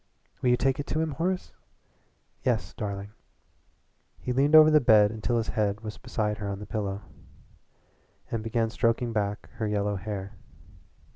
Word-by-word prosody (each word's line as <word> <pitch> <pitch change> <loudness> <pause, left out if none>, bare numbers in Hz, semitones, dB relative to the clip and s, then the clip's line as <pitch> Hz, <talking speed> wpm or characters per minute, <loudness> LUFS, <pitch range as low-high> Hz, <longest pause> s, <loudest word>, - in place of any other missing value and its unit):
Will 125 - +2
you 125 - +4
take 135 +2 +1
it 145 - -4
to 155 - -1
him, 160 -1 0
Horace?" 180 +6 -2 0.9
"Yes, - - 0
darling." 100 -1 -5 1.1
He 125 - -3
leaned 140 +4 +4
over 155 0 +9
the 150 -1 +6
bed 105 -4 +6
until 115 +2 -1
his 115 - -1
head 105 -2 0
was 110 -1 -7
beside 105 -4 -2
her 100 -1 -3
on 100 - -3
the 105 - -8
pillow, 100 -1 -3 1.3
and 115 - -1
began 115 0 -1
stroking 115 0 0
back 105 -1 -2
her 110 -1 -1
yellow 105 -1 0
hair. 100 0 -5
110 Hz, 160 wpm, -27 LUFS, 105-125 Hz, 1.3 s, over